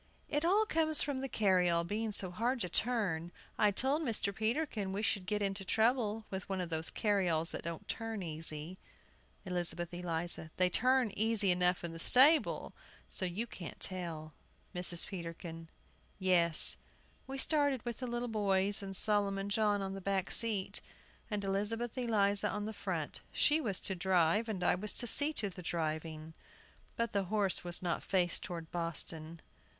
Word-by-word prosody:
It 295 +1 -1
all 400 +6 +3
comes 315 -4 +5
from 280 -2 -3
the 270 - -4
carryall 180 -6 +2
being 215 +5 -3
so 190 -3 -3
hard 240 +7 -1
to 180 - -2
turn. 185 -7 -1 0.3
I 210 - +5
told 265 +9 0
Mr. 225 -7 -1
Peterkin 220 -2 -2
we 205 +2 -3
should 200 -3 0
get 210 +1 -1
into 195 0 -2
trouble 220 +1 0
with 190 0 -6
one 190 -1 -2
of 175 -2 -4
those 160 0 +1
carryalls 180 -6 0
that - - -5
don't 170 -1 -7
turn 225 -3 -4
easy. 160 +1 -4 0.7
ELIZABETH 175 -1 -3
ELIZA. 175 -2 -2
They 180 -1 +2
turn 255 0 +2
easy 215 -3 +3
enough 180 0 +1
in 170 -1 -5
the 165 - -9
stable, 280 - +4 0.4
so 185 - -3
you 185 +6 -3
can't 180 -7 -9
tell. 165 -4 -2 0.4
MRS. 180 -1 +5
PETERKIN. 165 -2 -8 0.5
Yes; 175 -4 +6 0.5
we 270 +1 -6
started 285 -4 +1
with 235 -2 -5
the 255 - -4
little 240 0 -3
boys 200 -2 +2
and 195 -1 -6
Solomon 200 -1 +2
John 205 -1 +1
on 195 0 -4
the 195 - -7
back 195 0 -1
seat, 215 -5 +1 0.5
and 210 -2 -3
Elizabeth 210 +4 -2
Eliza 205 -5 +2
on 210 - -4
the 220 - -5
front. - - -5
She 300 +2 +2
was 200 -9 -1
to 190 - -1
drive, 185 +3 +1
and 190 -4 -3
I - - +3
was 205 +4 -3
to - - -3
see 290 +5 +5
to 210 -8 -2
the 180 - -10
driving. 160 -1 -4 0.6
But 230 -1 -2
the 200 -1 0
horse 200 -1 0
was 175 +1 -1
not 175 -1 -1
faced 180 -3 +1
toward 165 -3 -7
Boston. 165 -1 -4
195 Hz, 170 wpm, -33 LUFS, 175-225 Hz, 0.7 s, Yes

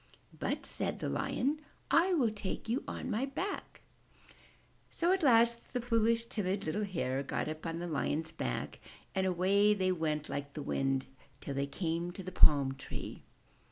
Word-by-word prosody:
*'But," - - -2
said - - -2
the - - -3
Lion, 290 +4 0 0.3
''I 360 +2 +5
will 240 -7 +3
take 205 0 -5
you 235 +5 0
on 255 - -4
my 230 +6 0
back." 365 +9 -4 1.1
So 345 +2 +1
at 380 - +1
last 235 -4 +4
the 250 - +1
foolish, 230 -1 +2
timid, 195 -3 -2
little 185 +7 0
Hare 140 -9 -1
got 140 - -2
up 155 +2 -4
on 165 0 -3
the 175 - -3
Lion's 160 0 -1
back 60 -1 -3 0.3
and 190 0 +1
away 195 +3 +4
they 185 -2 +2
went 155 -3 -1
like 140 0 -4
the 150 - -4
wind, 135 -1 0 0.3
till 140 - -5
they 140 +1 -1
came 170 +2 -2
to 190 - -7
the 185 - -6
Palm 140 -6 +6
Tree. 135 - -7
185 Hz, 170 wpm, -33 LUFS, 155-230 Hz, 1.1 s, Palm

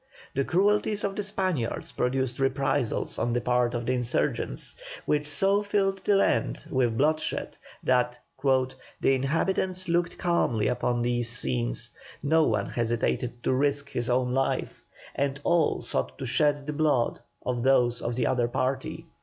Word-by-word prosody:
The 140 - +1
cruelties 205 +5 +2
of 195 -1 -1
the - - -1
Spaniards 185 - -2
produced 130 0 -1
reprisals 135 -2 0
on 120 +1 0
the 120 - +1
part 125 0 +1
of 120 0 -3
the 130 - +1
insurgents, 125 -1 0 0.3
which 150 0 +1
so 195 +8 +3
filled 195 -1 0
the 205 - +3
land 195 - +1
with 120 -4 +1
bloodshed 155 +3 0 0.3
that 125 -1 +2 0.3
"the 130 -2 +2 0.4
inhabitants 185 +7 0
looked 170 0 0
calmly 145 - +1
upon 120 -1 0
these 120 -1 +1
scenes; 60 - 0 0.3
no 160 +2 +4
one 105 -5 +1
hesitated 120 +1 -1
to - - +1
risk 140 +1 +1
his 120 0 -1
own 125 0 +1
life, 135 0 -1 0.3
and 140 0 -1
all 170 -3 +2
sought 65 0 -1
to - - -5
shed 145 +2 +2
the 150 - -3
blood 145 -6 +1 0.3
of 125 -1 -1
those 125 -2 +3
of 120 0 -2
the 120 -1 0
other 120 -2 +1
party." 130 +2 -2
130 Hz, 155 wpm, -27 LUFS, 120-155 Hz, 0.4 s, no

